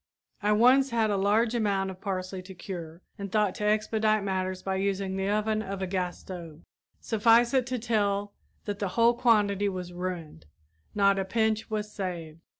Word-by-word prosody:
I 210 0 +2
once 255 +5 +5
had 225 -3 +1
a - - +1
large 210 +4 +2
amount 200 -4 0
of 185 0 -12
parsley 185 -2 -3
to 185 +1 -11
cure 175 -2 -8 0.2
and 200 -1 -5
thought 210 -3 +2
to - - 0
expedite 215 0 +2
matters 185 -1 -2
by 190 0 -1
using 195 0 -1
the 195 +1 -1
oven 215 +1 +1
of 195 -2 -5
a - - +1
gas 180 -1 -2
stove. 170 -4 -9 0.4
Suffice 230 +3 +3
it 260 -2 +2
to 255 -1 -2
tell 205 -3 0 0.3
that 205 -1 -4
the 200 - -1
whole 230 +1 +5
quantity 210 -4 +2
was 180 -2 -6
ruined, 175 - -6 0.5
not 200 -1 +4
a - - +1
pinch 220 +2 0
was 210 -1 -3
saved. 170 -5 -5
200 Hz, 180 wpm, -28 LUFS, 185-215 Hz, 0.5 s, once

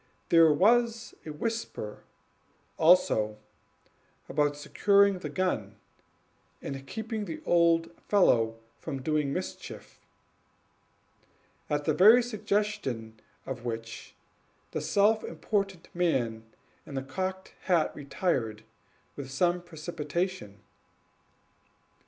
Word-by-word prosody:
There 165 -2 +7
was 230 +7 +2
a - - -4
whisper, 155 - -4 0.8
also, 155 -11 +4 0.9
about 145 0 +1
securing 200 +5 +3
the - - -5
gun, 185 -1 -2 0.8
and 135 -1 -7
keeping 220 +3 -4
the 165 -4 -6
old 170 -1 +3 0.2
fellow 115 - +3 0.2
from 135 -5 -5
doing 150 -1 0
mischief, - - -6 1.7
at 145 0 -1
the 155 - +2
very 215 +10 +7
suggestion 205 - -2 0.3
of 130 -3 -6
which 115 -1 -6 0.6
the - - -3
self 215 +2 +3
important 195 +2 -2
man 120 -11 0 0.4
in 140 - -9
the 135 - -2
cocked 190 +6 -4
hat 175 -4 +2
retired 130 - -2 0.5
with 140 -2 -7
some 175 +6 +1
precipitation. 165 - -4
165 Hz, 95 wpm, -29 LUFS, 135-195 Hz, 1.7 s, There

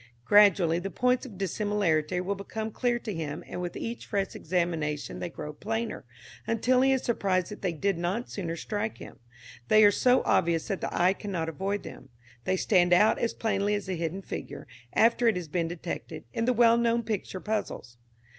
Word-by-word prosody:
Gradually 190 -4 +5
the 195 +2 -4
points 250 +4 +1
of 205 -6 -12
dissimilarity 185 -4 0
will 190 +2 -1
become 220 +2 -5
clear 240 +2 0
to 225 -3 -5
him, 155 -3 -5
and - - -6
with 175 -1 -4
each 230 +1 -5
fresh 195 -2 -1
examination 160 -4 -2
they 175 - -4
grow 150 -2 -7
plainer, 225 - -4 0.4
until 250 +3 +2
he 270 +1 +4
is 265 -1 +1
surprised 190 -6 0
that 210 - -8
they 185 - 0
did 175 +3 -1
not 190 +8 -2
sooner 170 -5 -4
strike 210 +5 -3
him; - - -11 0.5
they 215 0 +6
are 205 - +8
so 250 +4 +3
obvious 165 -1 +2
that 195 - -2
the - - -2
eye 180 +2 +3
cannot 185 -6 -4
avoid 195 +5 -3
them; - - -10 0.4
they 185 0 +1
stand 180 -2 +3
out 210 +5 +5
as 235 - -1
plainly 205 -1 0
as 205 - -4
the 185 - -3
hidden 170 +3 -3
figure, - - -7 0.3
after 235 +1 +4
it 225 - +4
has 180 -2 -4
been 165 +2 -1
detected, 165 -2 -6
in 230 - -1
the 250 - +3
well 235 -1 +5
known 235 0 +2
picture 210 -3 -3
puzzles. 205 - -4
195 Hz, 195 wpm, -28 LUFS, 175-220 Hz, 0.5 s, are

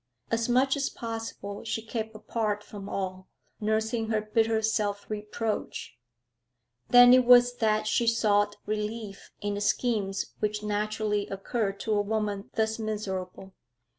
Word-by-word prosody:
As 230 +1 0
much 265 +3 +3
as 280 -1 -1
possible 225 -3 -6
she 225 0 -3
kept 220 -1 -4
apart 215 -1 -2
from 200 -1 -9
all, 185 -1 -4 0.3
nursing 220 +1 0
her 220 -1 +1
bitter 220 +1 +1
self 205 -2 0
reproach. 210 - -4 0.9
Then 245 0 +9
it 255 0 +7
was 245 0 +6
that 215 -1 +2
she 230 +2 +1
sought 205 -2 +3
relief 210 -1 -4
in 205 0 -1
the 205 - -3
schemes 205 -4 0
which 210 0 -1
naturally 210 0 -1
occur 195 +2 -2
to 215 +2 -3
a 205 - +3
woman 205 -1 -2
thus 220 0 0
miserable. 195 -3 -4
215 Hz, 135 wpm, -28 LUFS, 205-225 Hz, 0.9 s, Then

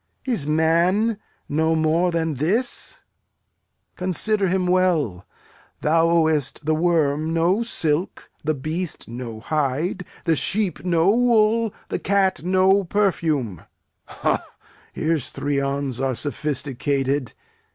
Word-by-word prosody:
Is 225 - -1
man 170 +8 +2 0.3
no 160 +2 +1
more 160 +3 +2
than 165 -2 -1
this? 225 +11 -1 0.9
Consider 195 +3 +1
him 185 0 0
well. 175 - +1 0.5
Thou 165 +2 +3 0.2
ow'st 155 -2 -1
the 155 - +2
worm 160 -1 +1
no 175 +6 +2
silk, 170 -7 -2
the 155 0 0
beast 155 +5 -4
no 120 -1 -7
hide, 155 - -1 0.2
the 165 - +3
sheep 195 +4 -1
no 175 +1 +3
wool, 230 -1 +3 0.2
the - - -2
cat 195 -1 +1
no 190 +2 +3
perfume. 160 - 0 0.4
Ha! - - -1 0.5
Here's 155 -4 -1
three 145 -1 -2
on's 140 -2 -2
are 135 -1 0
sophisticated! 140 -1 -1
165 Hz, 110 wpm, -22 LUFS, 145-185 Hz, 0.9 s, Thou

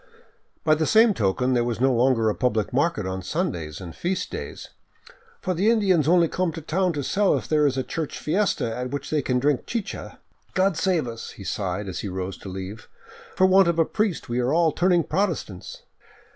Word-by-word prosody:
By 155 - +4
the 155 +1 +1
same 225 0 +5
token 125 - +1
there 120 -1 +2
was 120 -1 -2
no 130 +1 +3
longer 120 -2 +3
a 105 - +2
public 110 -4 -1
market 145 - +1
on 95 0 -3
Sundays 90 - -3
and 85 -4 -9
feast 185 +2 -2
days, - - -7 0.4
" 470 0 -24
for 185 - 0
the 190 +6 +2
Indians 190 - +3
only 170 0 +5
come 180 +1 -1
to 165 - -6
town 180 +4 0
to 145 -2 -3
sell 200 +8 +2
if - - -6
there 150 -1 +3
is 135 -1 -1
a 130 - 0
church 160 +2 -4
fiesta 155 - 0
at 125 +1 -4
which 145 +1 -5
they 155 -1 +2
can 125 -1 0
drink 140 +1 0
chicha." 230 -3 -5 0.2
" - - -38
God 190 -1 +2
save 165 -4 +1
us," 115 -1 -7
he 100 - -11
sighed 95 0 -3
as 90 - -4
he - - -4
rose 95 0 -4
to 95 - -8
leave, 95 +4 -7 0.2
" - - -19
for 185 - +4
want 190 0 +5
of 170 -1 +1
a 165 - +4
priest 210 -3 -1
we 120 0 -1
are 125 +2 +1
all 165 0 +3
turning 175 0 +2
Protestants 155 - -3
150 Hz, 220 wpm, -24 LUFS, 115-180 Hz, 0.4 s, same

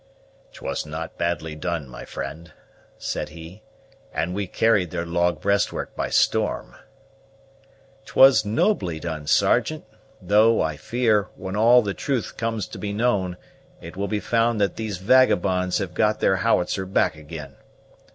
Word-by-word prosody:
"'Twas - - -4
not 80 +2 -6
badly 85 -2 -2
done, 80 -1 -3
my 60 - -10
friend," 80 +4 -7 0.4
said - - -4
he; 85 +5 -11 0.5
"and 85 +2 -2
we 100 0 -3
carried 105 -3 +2
their 85 0 -3
log 85 +1 0
breastwork 100 0 -1
by - - -2
storm." - - +1 1.3
"'Twas 135 -5 +6
nobly 105 - 0
done, 80 -2 -5
Sergeant; - - +2 0.3
though, 105 +4 +4
I 80 -1 0
fear, 110 - +1
when 95 0 -6
all 120 +3 +6
the 100 -1 -2
truth 130 0 -3
comes 115 -3 -2
to - - -9
be 105 - -3
known, 100 -5 0 0.4
it 85 +2 -10
will 100 +2 -2
be 105 0 -1
found 115 0 +1
that 100 -1 +1
these 110 -4 -4
vagabonds 95 -4 +3
have 95 -4 -4
got 105 +2 +1
their 95 - +2
howitzer 95 +1 0
back 95 -4 +1
ag'in. 75 -2 -9
95 Hz, 145 wpm, -23 LUFS, 85-110 Hz, 1.3 s, Twas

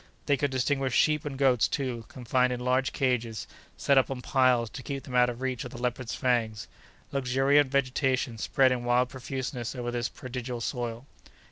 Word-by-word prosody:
They 145 - +3
could 145 +1 0
distinguish 130 0 0
sheep 150 0 +3
and 140 -2 -4
goats 130 -4 +4
too, 125 -5 -3
confined 125 0 0
in 125 - -2
large 130 +1 +1
cages, 120 -5 -1 0.3
set 140 -1 +4
up 130 - 0
on 130 -2 -5
piles 130 -3 +3
to 130 - -7
keep 135 0 -5
them 130 - -9
out 125 0 +5
of 120 +1 -6
reach 130 -3 -2
of 125 - -6
the 120 - -10
leopards' 125 -1 -2
fangs. 115 -4 0 0.4
Luxuriant 135 +1 +3
vegetation 130 -3 0
spread 130 +4 +3
in 125 -1 -1
wild 125 +1 +2
profuseness 130 -2 -5
over 120 -1 -3
this 120 0 -1
prodigal 125 -1 -6
soil. 120 +1 -3
125 Hz, 180 wpm, -28 LUFS, 120-135 Hz, 0.4 s, out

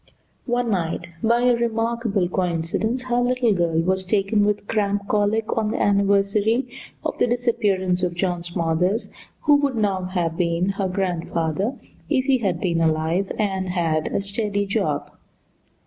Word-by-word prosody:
One 240 -1 0
night 175 -2 -2
by 235 +1 +3
a 245 0 +4
remarkable 230 -4 0
coincidence 180 +7 -1
her 245 -1 0
little 245 -2 +2
girl 170 -3 +1
was 190 +2 0
taken 200 +2 +1
with 205 0 -1
cramp 205 -2 0
colic 215 +1 +1
on 220 -2 0
the - - -2
anniversary 200 +4 +2 0.4
of - - -2
the - - +3
disappearance 205 -7 +1
of 175 -1 -1
John 175 -1 -1
Smothers, 175 +4 -1 0.3
who 295 - +4
would 285 -3 0
now 200 -4 0
have 175 -3 -2
been 170 +1 +1
her 195 -1 -1
grandfather 180 - -1 0.3
if 265 -4 +1
he 265 -2 +3
had 190 -6 -1
been 170 -3 0
alive 160 +4 +1
and 190 -3 -1
had 165 -4 0
a - - -1
steady 205 0 -1
job. 195 - -1
200 Hz, 150 wpm, -23 LUFS, 180-225 Hz, 0.4 s, a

